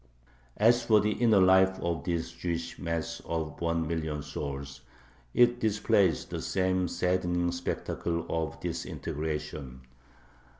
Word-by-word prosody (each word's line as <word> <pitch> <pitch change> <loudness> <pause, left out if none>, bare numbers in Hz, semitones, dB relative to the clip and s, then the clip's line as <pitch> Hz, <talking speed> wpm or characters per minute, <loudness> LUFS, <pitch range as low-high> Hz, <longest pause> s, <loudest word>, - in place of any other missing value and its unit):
As 120 +3 +5
for 110 -2 +5
the 105 +1 +1
inner 110 -3 +4
life 95 0 +5
of 85 -4 -2
this 85 -1 -1
Jewish 85 -1 -4
mass 85 -1 -3
of 80 -2 -4
one 85 -1 0
million 80 -2 -2
souls, 70 -1 -6 0.5
it 120 - +4
displays 100 - +2
the - - -5
same 95 -1 +1
saddening 90 0 0
spectacle 85 -1 -3
of 80 0 -2
disintegration. 75 -5 -4
85 Hz, 120 wpm, -29 LUFS, 80-95 Hz, 0.5 s, As